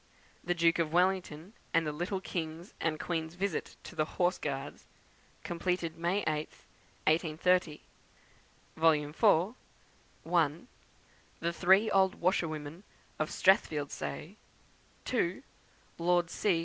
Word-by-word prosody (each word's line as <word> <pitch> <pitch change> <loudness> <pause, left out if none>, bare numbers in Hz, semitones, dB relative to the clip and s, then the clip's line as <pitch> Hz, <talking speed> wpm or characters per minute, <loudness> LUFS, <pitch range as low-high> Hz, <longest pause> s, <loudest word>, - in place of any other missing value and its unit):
The 175 +1 0
Duke 170 0 +3
of 160 -2 0
Wellington 180 0 0 0.2
and 165 -1 +4
the 150 - -1
little 175 +5 -3
King's 165 -1 -5
and 155 -2 -1
Queen's 160 -1 -3
visit 190 -2 -2
to - - -10
the 155 - +1
Horse 180 0 +2
Guards; 140 -1 -5 0.6
completed 170 -1 -2
May 175 +5 0
8th, 155 0 -3 0.4
1830. 160 0 +2 1.0
4th 150 -2 +3
Vol.: 200 +3 +3 0.7
1. 165 +2 +1 0.7
The 170 0 -1
three 190 +5 +4
old 190 -1 +4
Washer 180 -1 +1
women 155 +3 -7 0.4
of 155 +1 0
Strathfieldsaye; 145 - 0 0.7
2. - - 0 0.6
Lord 175 0 +2
C. 185 -6 +1
170 Hz, 115 wpm, -31 LUFS, 155-180 Hz, 1.0 s, and